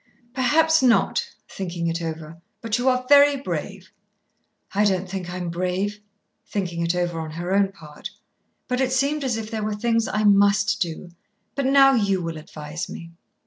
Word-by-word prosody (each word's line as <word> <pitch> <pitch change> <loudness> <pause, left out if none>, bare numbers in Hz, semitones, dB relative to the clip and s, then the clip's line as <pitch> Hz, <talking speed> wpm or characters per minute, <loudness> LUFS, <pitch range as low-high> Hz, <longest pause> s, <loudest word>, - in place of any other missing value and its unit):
"Perhaps 320 +5 +3
not," 265 - +2 0.2
thinking 175 -3 -5
it 165 0 -1
over; 165 0 -6 0.2
"but 230 0 -2
you 255 +2 +3
are 255 0 0
very 285 0 +6
brave." 275 - -5 0.8
"I 205 +2 +2
don't 190 -2 +1
think 185 -1 -5
I'm 180 -1 -4
brave," 185 +4 -2 0.5
thinking 175 -4 -3
it 170 +1 0
over 175 -2 -1
on 160 -1 -5
her 175 +3 -3
own 195 -1 +3
part, 160 0 -10 0.6
"but 250 0 -1
it 260 -1 +1
seemed 280 +3 0
as 250 -4 -1
if 220 0 -6
there 220 -1 -3
were 210 0 -2
things 230 +1 0
I 215 - -1
must 200 0 +3
do. 175 0 -4 0.4
But 275 -2 -1
now 270 0 +6
you 200 -6 +1
will 165 -2 -4
advise 150 +2 -7
me." 170 0 -9
200 Hz, 175 wpm, -23 LUFS, 175-250 Hz, 0.8 s, very